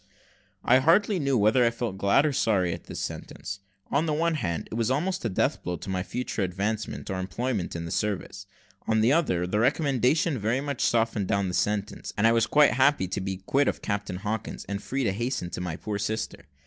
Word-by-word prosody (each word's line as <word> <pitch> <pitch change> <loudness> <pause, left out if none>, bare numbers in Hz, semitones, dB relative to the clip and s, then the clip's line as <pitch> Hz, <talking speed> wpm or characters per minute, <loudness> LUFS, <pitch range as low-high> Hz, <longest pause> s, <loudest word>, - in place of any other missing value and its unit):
I 130 +2 +5
hardly 185 +7 +3
knew 140 -3 +1
whether 110 +4 +4
I 120 - +5
felt 115 -5 -4
glad 100 +9 +4
or 150 - +1
sorry 95 -9 +2
at - - -8
this - - -7
sentence. 100 +1 -6 0.3
On 150 +4 +2
the 150 - +1
one 165 +2 +1
hand, 95 - -2
it - - -6
was 115 0 0
almost 180 +8 0
a - - +1
death 95 - 0
blow 90 - -3
to 95 - -6
my 95 -1 -1
future 120 +3 -3
advancement 100 +3 -2
or 95 - -2
employment 100 +1 -2
in 85 0 -4
the 85 - -6
service; 100 -1 -3 0.4
on 110 -1 +3
the 120 +5 +4
other, 120 - +1
the 105 +4 0
recommendation 140 +2 +2
very 110 +5 0
much 140 -2 -3
softened 115 -4 +1
down 100 -1 +1
the - - -4
sentence, 105 +2 -1
and 105 - +2
I 115 - +6
was 115 -1 +3
quite 150 -1 +5
happy 130 -4 +3
to 95 - -2
be 95 0 -4
quit 140 +1 +2
of - - -2
Captain 100 -2 -2
Hawkins, 105 +2 -4
and 100 0 -3
free 135 +4 -2
to 105 - +2
hasten 110 -4 -3
to 90 - -4
my 90 -3 -3
poor 105 +3 -4
sister. 110 +2 -3
110 Hz, 220 wpm, -27 LUFS, 95-135 Hz, 0.4 s, I